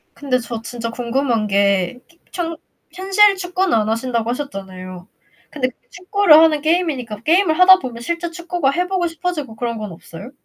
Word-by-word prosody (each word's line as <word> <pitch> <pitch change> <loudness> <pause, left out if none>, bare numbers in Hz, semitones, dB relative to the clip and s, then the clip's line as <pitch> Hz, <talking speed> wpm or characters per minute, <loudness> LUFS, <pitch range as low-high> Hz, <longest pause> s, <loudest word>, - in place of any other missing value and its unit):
근데 270 -3 -1
저 235 -1 -6
진짜 230 0 -5
궁금한 235 -2 -1
게 200 +1 +1
키 340 0 -27
현 330 -2 -3 0.4
현실 390 +2 +4
축구는 365 0 -1
안 215 -2 +2
하신다고 230 0 -1
하셨잖아요. 190 -8 -7 0.4
근데 255 -4 -2 0.2
축구를 365 -2 +4
하는 315 -2 +4
게임이니까 295 - -1
게임을 325 +1 +3
하다 375 0 +8
보면 245 -7 -7
실제 340 +6 -3
축구가 345 -4 -1
해 355 +5 -1
보고 365 -2 0
싶어지고 325 -7 -4
그런 235 0 -3
건 210 -3 -6
없어요? 170 +7 -11
275 Hz, 360 characters per minute, -19 LUFS, 230-350 Hz, 0.4 s, 하다